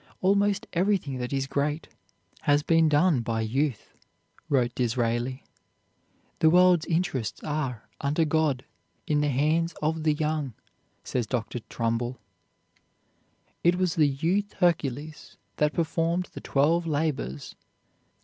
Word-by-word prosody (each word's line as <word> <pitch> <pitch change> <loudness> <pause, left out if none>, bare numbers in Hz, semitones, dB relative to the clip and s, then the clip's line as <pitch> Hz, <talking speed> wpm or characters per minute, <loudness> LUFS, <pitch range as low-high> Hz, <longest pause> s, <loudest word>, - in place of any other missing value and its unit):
"Almost 200 +1 +2
everything 175 -7 0
that 125 0 -4
is 135 -1 0
great 145 +3 -2 0.5
has 145 -1 +2
been 165 0 +4
done 150 -1 +3
by 115 -1 -2
youth," 130 +2 -1 0.6
wrote 125 -4 +2
Disraeli. 120 +1 -1 1.0
"The 160 - +5
world's 180 -1 +5
interests 160 - -1
are, 135 -7 -3
under 150 +4 +1
God, 150 -4 +1 0.4
in 150 -1 +1
the 150 - +1
hands 155 +5 +1
of 160 +1 -1
the 155 -1 +2
young," 150 -5 -2 0.5
says 120 -3 -2
Dr. 120 0 -2
Trumbull. 120 +2 -1 1.5
It 175 +1 +4
was 180 -2 +1
the 155 -3 +4
youth 175 +9 -1
Hercules 155 -4 -1 0.2
that 150 0 +2
performed 170 +2 0
the - - -8
Twelve 165 +5 +2
Labors. 145 - -2
150 Hz, 120 wpm, -27 LUFS, 130-165 Hz, 1.5 s, The